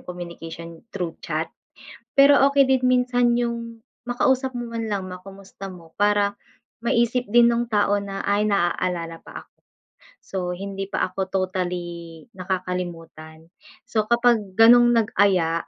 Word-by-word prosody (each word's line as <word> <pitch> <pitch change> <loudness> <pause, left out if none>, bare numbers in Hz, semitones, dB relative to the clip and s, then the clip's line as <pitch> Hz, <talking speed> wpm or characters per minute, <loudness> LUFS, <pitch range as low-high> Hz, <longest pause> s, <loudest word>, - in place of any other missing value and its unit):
communication 170 -2 -9
through 175 -5 -4
chat, 160 0 -3 0.6
pero 275 0 +6
okey 280 -1 +4
din 265 -1 +2
minsan 250 -1 +2
yung, 235 -1 -4 0.2
makausap 260 +1 +1
mo 240 - -4
man 225 -1 -3
lang, 200 -2 -2
ma-kumusta 195 +1 -10
mo 170 -3 -13
para 205 0 +3 0.5
maisip 235 +1 +1
din 235 +2 +5
nung 235 0 0
tao 205 -2 +2
na, 195 -1 -5
"Ay, 205 +1 +1
naaalala 175 -3 -1
pa - - -10
ako - - -41 0.7
so 195 - -7 0.2
hindi 195 +1 -5
pa 185 - -1
ako 190 0 -3
totally 175 -3 -4
nakakalimutan." 175 -4 -5 0.4
So 220 -4 -1
kapag 235 -5 +2
ganong 240 +2 +7
nag-aya, 190 -6 +1
200 Hz, 130 wpm, -23 LUFS, 180-235 Hz, 0.7 s, ganong